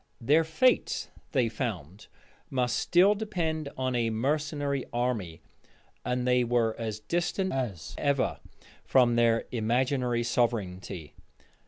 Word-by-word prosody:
Their 145 +7 +4
fate, 160 +11 +1 0.2
they 130 -5 +2
found, 105 - -5 0.4
must 125 -2 0
still 185 +4 +4
depend 170 -8 -2
on 130 -1 -1
a 120 -2 +1
mercenary 145 +3 -1
army; 110 -9 -2 0.6
and 125 0 -1
they 125 0 +4
were 115 -2 +1
as 110 -2 -3
distant 175 - -1
as 115 -11 -3
ever 140 -2 +1 0.4
from 125 -3 +4
their 115 -1 +3
imaginary 120 +1 0
sovereignty. 100 -9 -2
125 Hz, 115 wpm, -28 LUFS, 115-145 Hz, 0.6 s, Their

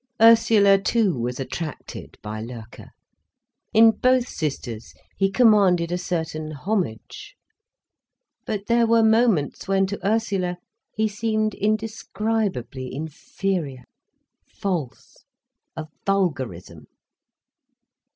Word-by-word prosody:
Ursula 220 -3 +6
too 215 -2 +2
was 120 0 -3
attracted 150 +3 -6
by 110 +1 -5
Loerke. 115 -1 -10 0.8
In 225 +1 +7
both 255 +1 +2
sisters 135 - -5 0.2
he 195 0 +1
commanded 195 -6 +4
a 175 - 0
certain 160 -3 -3
homage. 205 - -4 1.1
But 205 -2 -3
there 235 0 +3
were 230 0 +4
moments 220 -9 +2
when 195 0 +2
to 195 -1 -6
Ursula 195 -4 0 0.4
he 220 0 +1
seemed 215 0 -1
indescribably 210 - -2
inferior, 155 -1 -4 0.6
false, 170 -10 -5 0.6
a 160 0 -5 0.2
vulgarism. 130 - -2
195 Hz, 95 wpm, -23 LUFS, 150-220 Hz, 1.1 s, In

